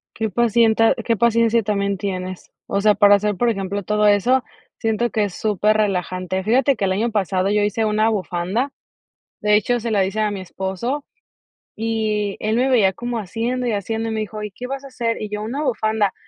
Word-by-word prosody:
Qué 220 -1 -1
pacienta 225 +1 +3
qué 230 -1 +1
paciencia 230 0 +3
también 200 -1 -1
tienes. 185 -1 -5 0.2
O 200 - 0
sea, 210 0 +5
para 205 0 +6
hacer, 205 0 0
por 240 +4 +1
ejemplo, 195 -1 -2
todo 210 +2 +1
eso, 240 +6 +3 0.3
siento 225 +1 0
que 215 -2 0
es 195 - -6
superrelajante. 190 -3 0
Fíjate 260 +6 +3
que 195 - -1
el 190 - 0
año 220 +5 0
pasado 190 -2 0
yo 210 0 +2
hice 210 +2 0
una 215 +1 +2
bufanda. 195 +6 -1 0.7
De 210 0 +3
hecho, 240 +4 +1
se 235 +1 -3
la 200 -3 +3
hice 195 +3 -3
a 215 -1 +1
mi 200 -2 -5
esposo 190 +10 -4 0.7
y 215 -2 -1
él 215 +1 0
me 255 +2 +2
veía 220 -7 +4
como 240 +3 -4
haciendo, 230 +5 -2
y 235 - +1
haciendo, 220 +3 -2
y - - -3
me 220 - -2
dijo: 215 0 -5
"¿Y 210 - -5
qué 245 +6 -7
vas 275 +1 -5
a 275 - -9
hacer?", 235 -4 -2
y 215 - -4
yo: 210 0 -4
"Una 250 +8 -3
bufanda", 215 -6 0
215 Hz, 205 wpm, -21 LUFS, 200-230 Hz, 0.7 s, para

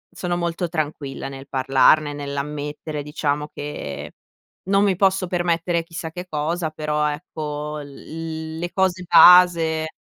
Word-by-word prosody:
sono 175 -1 -2
molto 170 0 -2
tranquilla 150 -4 -4
nel 135 0 -9
parlarne, 135 +3 +3
nell'ammettere 145 +1 -5
diciamo 150 0 -2
che 145 - -6 0.6
non 195 +1 +4
mi 195 -3 +2
posso 190 0 +2
permettere 170 -1 0
chissà 165 -1 -7
che 180 +2 -7
cosa, 160 +2 -2
però 150 -1 -1
ecco 150 -1 -5
l 160 +2 -7
le 175 +1 -4
cose 185 -1 +1
base. 165 -3 +6
160 Hz, 125 wpm, -22 LUFS, 150-175 Hz, 0.6 s, base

